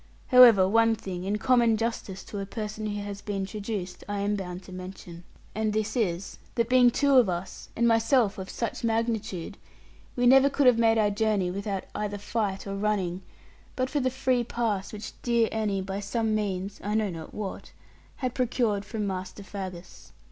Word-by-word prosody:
However, 235 Hz, -7 st, +8 dB
one 225 Hz, +2 st, +4 dB
thing, 185 Hz, -4 st, -6 dB
in 205 Hz, +2 st, 0 dB
common 235 Hz, -1 st, +3 dB
justice 210 Hz, -4 st, -3 dB
to 205 Hz, -, -7 dB
a 195 Hz, -, -3 dB
person 215 Hz, 0 st, -5 dB
who 205 Hz, -1 st, -3 dB
has 200 Hz, -1 st, -6 dB
been 195 Hz, -2 st, -3 dB
traduced, 195 Hz, -2 st, -5 dB
I 205 Hz, -1 st, -2 dB
am 205 Hz, +1 st, 0 dB
bound 180 Hz, -2 st, -6 dB
to -, -, -13 dB
mention. 180 Hz, -2 st, -9 dB, 0.3 s
And 215 Hz, 0 st, -1 dB
this 215 Hz, +2 st, -1 dB
is, 190 Hz, -6 st, -2 dB, 0.2 s
that 235 Hz, 0 st, +1 dB
being 250 Hz, -1 st, +6 dB
two 280 Hz, +2 st, +3 dB
of 240 Hz, -6 st, +5 dB
us, 175 Hz, +1 st, -5 dB
and 235 Hz, +1 st, +2 dB
myself 225 Hz, -2 st, +3 dB
of 190 Hz, -, -6 dB
such 230 Hz, -1 st, -4 dB
magnitude, 225 Hz, -5 st, -2 dB, 0.6 s
we 245 Hz, -, +1 dB
never 270 Hz, +2 st, +7 dB
could 280 Hz, 0 st, +1 dB
have 245 Hz, -2 st, +6 dB
made 225 Hz, -1 st, +4 dB
our 210 Hz, -2 st, +3 dB
journey 205 Hz, -3 st, +1 dB
without 200 Hz, 0 st, -3 dB
either 205 Hz, -1 st, -3 dB
fight 205 Hz, -1 st, -2 dB
or 195 Hz, 0 st, -4 dB
running, 195 Hz, -3 st, -1 dB, 0.5 s
but 255 Hz, 0 st, -1 dB
for 295 Hz, -, +1 dB
the 260 Hz, -1 st, +1 dB
free 255 Hz, -1 st, +1 dB
pass 220 Hz, -5 st, -2 dB
which 210 Hz, 0 st, -7 dB
dear 235 Hz, -2 st, +2 dB
Annie, 205 Hz, -3 st, -1 dB
by 195 Hz, +1 st, -4 dB
some 220 Hz, +2 st, -1 dB
means 200 Hz, -2 st, -2 dB
(I 210 Hz, +1 st, -1 dB
know 215 Hz, -3 st, +1 dB
not 160 Hz, -2 st, -8 dB
what), 205 Hz, -3 st, -6 dB, 0.4 s
had 255 Hz, -3 st, -3 dB
procured 235 Hz, -5 st, 0 dB
from 215 Hz, 0 st, -4 dB
Master 190 Hz, +1 st, -5 dB
Faggus. 185 Hz, -3 st, -8 dB
210 Hz, 185 wpm, -27 LUFS, 195-230 Hz, 0.6 s, However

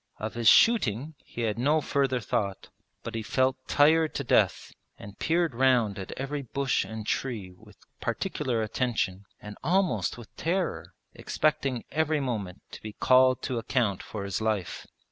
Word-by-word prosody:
Of 110 Hz, +1 st, -5 dB
his 115 Hz, -1 st, -1 dB
shooting 145 Hz, -, +4 dB
he 120 Hz, -, -7 dB
had 110 Hz, -1 st, -1 dB
no 150 Hz, +5 st, +3 dB
further 135 Hz, -3 st, 0 dB
thought; 100 Hz, -3 st, -3 dB, 0.3 s
but 115 Hz, -, -6 dB
he 115 Hz, -, -2 dB
felt 130 Hz, +4 st, +1 dB
tired 155 Hz, +2 st, +4 dB
to 140 Hz, -, -2 dB
death 120 Hz, -, +1 dB, 0.2 s
and 100 Hz, 0 st, -12 dB
peered 165 Hz, -2 st, +1 dB
round 120 Hz, -5 st, +2 dB
at 95 Hz, -, -7 dB
every 140 Hz, +2 st, -4 dB
bush 135 Hz, +1 st, -1 dB
and 110 Hz, -1 st, -7 dB
tree 110 Hz, -7 st, -2 dB
with -, -, -18 dB, 0.2 s
particular 120 Hz, -4 st, -2 dB
attention 110 Hz, -4 st, -2 dB
and 105 Hz, 0 st, -10 dB
almost 180 Hz, 0 st, +1 dB
with 120 Hz, -3 st, -13 dB
terror, 180 Hz, +2 st, -2 dB, 0.2 s
expecting 145 Hz, -5 st, -1 dB
every 155 Hz, 0 st, +1 dB
moment 105 Hz, -9 st, -4 dB
to -, -, -10 dB
be 110 Hz, -1 st, -7 dB
called 130 Hz, +2 st, +4 dB
to 125 Hz, -3 st, -2 dB
account 115 Hz, -5 st, 0 dB
for 105 Hz, -3 st, -6 dB
his 100 Hz, +2 st, -3 dB
life. 110 Hz, -5 st, -2 dB
125 Hz, 160 wpm, -27 LUFS, 110-140 Hz, 0.3 s, shooting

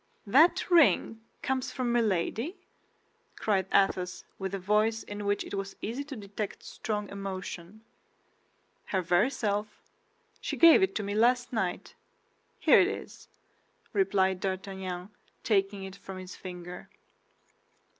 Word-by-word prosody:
"That 290 Hz, -, +5 dB
ring 280 Hz, -9 st, +4 dB, 0.2 s
comes 260 Hz, -1 st, -1 dB
from 250 Hz, -2 st, -1 dB
Milady?" 230 Hz, -, 0 dB, 0.8 s
cried 195 Hz, -3 st, 0 dB
Athos, 185 Hz, -2 st, +1 dB, 0.2 s
with 195 Hz, 0 st, -3 dB
a -, -, -2 dB
voice 210 Hz, +4 st, +1 dB
in 205 Hz, 0 st, -6 dB
which 205 Hz, 0 st, +1 dB
it -, -, -9 dB
was 195 Hz, 0 st, -4 dB
easy 240 Hz, +6 st, -3 dB
to 280 Hz, -1 st, -7 dB
detect 205 Hz, -1 st, -6 dB
strong 210 Hz, -2 st, -4 dB
emotion. 195 Hz, 0 st, -6 dB, 1.0 s
"Her 190 Hz, -2 st, -1 dB
very 175 Hz, +8 st, +3 dB
self; 210 Hz, -5 st, -2 dB, 0.6 s
she -, -, -3 dB
gave 335 Hz, +3 st, +8 dB
it 380 Hz, -11 st, +1 dB
me 205 Hz, -1 st, -3 dB
last 245 Hz, +3 st, +2 dB
night. 190 Hz, -6 st, -2 dB, 0.6 s
Here -, -, +6 dB
it -, -, +3 dB
is," -, -, -7 dB, 0.7 s
replied 190 Hz, -, +2 dB
D'Artagnan, 190 Hz, -1 st, -4 dB, 0.3 s
taking 195 Hz, -2 st, +1 dB
it 190 Hz, 0 st, -8 dB
from 195 Hz, -1 st, -9 dB
his 185 Hz, 0 st, -8 dB
finger. 180 Hz, -1 st, -8 dB
200 Hz, 125 wpm, -29 LUFS, 190-225 Hz, 1.0 s, gave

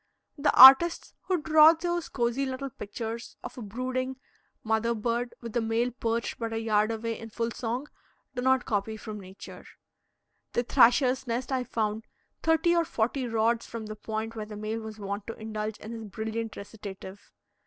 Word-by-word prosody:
The 290 Hz, -1 st, +2 dB
artists 270 Hz, +7 st, +9 dB
who 370 Hz, -2 st, +1 dB
draw 315 Hz, 0 st, +7 dB
those 345 Hz, 0 st, -3 dB
cosy 240 Hz, +2 st, 0 dB
little 265 Hz, 0 st, -4 dB
pictures 225 Hz, +2 st, -6 dB
of -, -, -7 dB
a 250 Hz, -, -8 dB
brooding 255 Hz, +4 st, -3 dB, 0.5 s
mother 220 Hz, +1 st, +1 dB
bird 235 Hz, +2 st, -2 dB
with 230 Hz, -2 st, -7 dB
the 240 Hz, -, +1 dB
male 225 Hz, +2 st, 0 dB
perched 230 Hz, -1 st, -2 dB
but 230 Hz, -1 st, -3 dB
a 225 Hz, -, -2 dB
yard 215 Hz, -1 st, +2 dB
away 230 Hz, 0 st, -3 dB
in 225 Hz, -, -8 dB
full 230 Hz, +1 st, -2 dB
song, 240 Hz, +4 st, -3 dB, 0.5 s
do 245 Hz, -, -3 dB
not 260 Hz, 0 st, +2 dB
copy 215 Hz, +1 st, -2 dB
from 215 Hz, 0 st, -7 dB
nature. 190 Hz, 0 st, -11 dB, 0.9 s
The 240 Hz, -, +1 dB
thrasher's 255 Hz, +2 st, +4 dB
nest 245 Hz, +3 st, -2 dB
I 260 Hz, -1 st, 0 dB
found 220 Hz, -2 st, -2 dB, 0.3 s
thirty 325 Hz, +2 st, +3 dB
or 340 Hz, -, +3 dB
forty 250 Hz, -2 st, -1 dB
rods 230 Hz, 0 st, +1 dB
from 230 Hz, -1 st, -6 dB
the 215 Hz, 0 st, -6 dB
point 220 Hz, +1 st, -5 dB
where 215 Hz, -1 st, -5 dB
the 210 Hz, -1 st, -8 dB
male 215 Hz, +2 st, -3 dB
was 220 Hz, -1 st, -8 dB
wont 200 Hz, 0 st, -5 dB
to 225 Hz, -, -5 dB
indulge 215 Hz, -1 st, -4 dB
in 220 Hz, -, -9 dB
his 225 Hz, -1 st, -7 dB
brilliant 220 Hz, +2 st, -4 dB
recitative. 200 Hz, -1 st, -10 dB
230 Hz, 175 wpm, -28 LUFS, 220-255 Hz, 0.9 s, artists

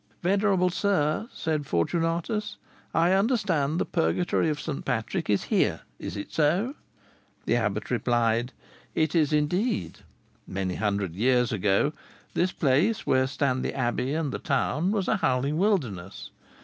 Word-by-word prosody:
"Venerable 190 Hz, -1 st, +2 dB
sir!" 195 Hz, +1 st, 0 dB
said 155 Hz, -3 st, -2 dB
Fortunatus, 165 Hz, -, -1 dB, 0.3 s
"I 170 Hz, +2 st, +3 dB
understand 190 Hz, -, +1 dB
the -, -, +1 dB
Purgatory 175 Hz, -1 st, +1 dB
of 150 Hz, -1 st, -2 dB
St. 145 Hz, -2 st, -4 dB
Patrick 125 Hz, -, -2 dB
is 100 Hz, -2 st, +2 dB
here: -, -, +1 dB, 0.2 s
is -, -, -5 dB
it 100 Hz, -, -7 dB
so?" 175 Hz, -, +2 dB, 0.7 s
The -, -, +2 dB
abbot 105 Hz, -1 st, -2 dB
replied, 120 Hz, 0 st, +1 dB, 0.4 s
"It 155 Hz, -1 st, +1 dB
is 155 Hz, -4 st, +3 dB
so 150 Hz, -, +2 dB
indeed. 150 Hz, -, -1 dB, 0.5 s
Many 95 Hz, -1 st, -2 dB
hundred 100 Hz, -3 st, -1 dB
years 125 Hz, +5 st, +2 dB
ago, 105 Hz, +7 st, +2 dB, 0.4 s
this 180 Hz, +1 st, +1 dB
place, 170 Hz, +11 st, +1 dB
where 130 Hz, 0 st, +3 dB
stand 135 Hz, -2 st, 0 dB
the -, -, -3 dB
abbey 130 Hz, +2 st, -1 dB
and 160 Hz, -4 st, -1 dB
the -, -, -4 dB
town, 160 Hz, +6 st, 0 dB
was 205 Hz, -3 st, 0 dB
a 215 Hz, -, +2 dB
howling 140 Hz, 0 st, 0 dB
wilderness. 120 Hz, -, -1 dB
150 Hz, 145 wpm, -27 LUFS, 120-180 Hz, 0.7 s, I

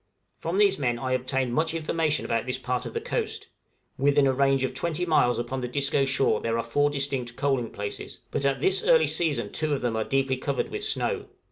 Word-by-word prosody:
From 170 Hz, +3 st, -2 dB
these 200 Hz, -2 st, +4 dB
men 120 Hz, -4 st, 0 dB
I 130 Hz, +2 st, -3 dB
obtained 130 Hz, 0 st, 0 dB
much 160 Hz, +3 st, 0 dB
information 160 Hz, -1 st, 0 dB
about 115 Hz, +2 st, -1 dB
this 125 Hz, 0 st, -1 dB
part 125 Hz, -1 st, -2 dB
of 115 Hz, -, -9 dB
the -, -, +1 dB
coast; -, -, -3 dB, 0.5 s
within 140 Hz, +1 st, +4 dB
a 135 Hz, -, +3 dB
range 135 Hz, 0 st, +2 dB
of 130 Hz, -1 st, -1 dB
20 170 Hz, +5 st, -1 dB
miles 125 Hz, -8 st, +3 dB
upon 120 Hz, +3 st, -3 dB
the 125 Hz, -, -3 dB
Disco 140 Hz, +2 st, +1 dB
shore 135 Hz, 0 st, +2 dB
there 115 Hz, 0 st, -1 dB
are 115 Hz, -, -1 dB
four 145 Hz, +6 st, +1 dB
distinct 135 Hz, -4 st, -2 dB
coaling 135 Hz, -4 st, 0 dB
places; 100 Hz, 0 st, -6 dB
but -, -, -2 dB
at 140 Hz, -1 st, +1 dB
this 385 Hz, -, +2 dB
early -, -, +5 dB
season 140 Hz, -11 st, 0 dB
two 155 Hz, -2 st, +1 dB
of -, -, -5 dB
them 120 Hz, -2 st, -1 dB
are 110 Hz, -, 0 dB
deeply 135 Hz, +1 st, 0 dB
covered 140 Hz, +1 st, -2 dB
with 425 Hz, -, -4 dB
snow. 435 Hz, +1 st, -1 dB
135 Hz, 220 wpm, -26 LUFS, 125-150 Hz, 0.5 s, early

